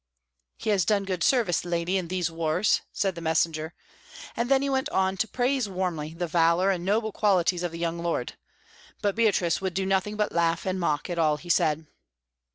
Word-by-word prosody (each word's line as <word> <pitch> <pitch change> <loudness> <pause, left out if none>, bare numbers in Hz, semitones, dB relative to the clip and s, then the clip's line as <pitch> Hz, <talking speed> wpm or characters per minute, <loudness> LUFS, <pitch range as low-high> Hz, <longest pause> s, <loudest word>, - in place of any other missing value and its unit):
"He 215 - -1
has 195 -3 +3
done 200 +3 +1
good 185 -3 -2
service, 225 -10 +2
lady, 175 +1 -1
in 185 -3 -1
these 175 -1 -1
wars," 165 +4 +1
said 195 -2 -1
the 170 - -8
messenger; 160 0 0 0.6
and 235 +1 -1
then 270 0 +4
he - - 0
went 265 -1 0
on 190 0 +1
to 220 - 0
praise 250 -1 0
warmly 170 -5 -3
the 175 +1 -2
valour 170 +3 +3
and 180 -2 -2
noble 215 +3 0
qualities 185 -4 +2
of 175 -2 -2
the 165 - -7
young 170 0 -2
lord; 170 0 -2 0.7
but 205 -1 +2
Beatrice 200 -7 +1
would 190 -3 -3
do 190 0 0
nothing 195 +2 0
but 210 -1 0
laugh 165 0 +1
and 185 0 -1
mock 150 -4 0
at 175 -1 -3
all 155 -2 +3
he 175 +3 -12
said. 155 -1 +2
180 Hz, 200 wpm, -26 LUFS, 165-200 Hz, 0.7 s, then